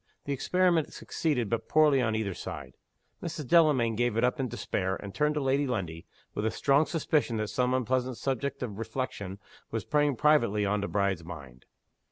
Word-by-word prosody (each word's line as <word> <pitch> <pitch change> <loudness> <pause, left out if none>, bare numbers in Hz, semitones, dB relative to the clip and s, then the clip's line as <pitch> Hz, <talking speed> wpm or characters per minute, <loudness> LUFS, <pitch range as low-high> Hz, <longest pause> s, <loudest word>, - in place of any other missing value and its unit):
The 140 - -1
experiment 175 +3 +1
succeeded 140 -9 -1
but 115 +2 -2
poorly 150 -4 +5
on 110 -3 0
either 105 -3 -1
side. - - -7 0.5
Mrs. 155 -5 -5
Delamayn 145 -9 +4
gave 120 -1 0
it 115 - +2
up 125 +4 +1
in 130 - 0
despair, 95 -4 -2
and 100 0 -8
turned 150 +3 +1
to - - +1
Lady 135 +1 +1
Lundie, 90 -9 -4 0.3
with 105 - -3
a 110 - +2
strong 140 +6 +2
suspicion 150 -7 0
that 110 -1 -2
some 125 +3 +1
unpleasant 130 0 0
subject 140 0 -2
of 105 -4 -5
reflection 110 -5 -4 0.3
was - - -3
preying 145 -2 +2
privately 115 -8 +3
on 105 +1 0
the 100 - -2
bride's 100 -4 0
mind. 70 -7 -10
125 Hz, 185 wpm, -29 LUFS, 105-145 Hz, 0.5 s, poorly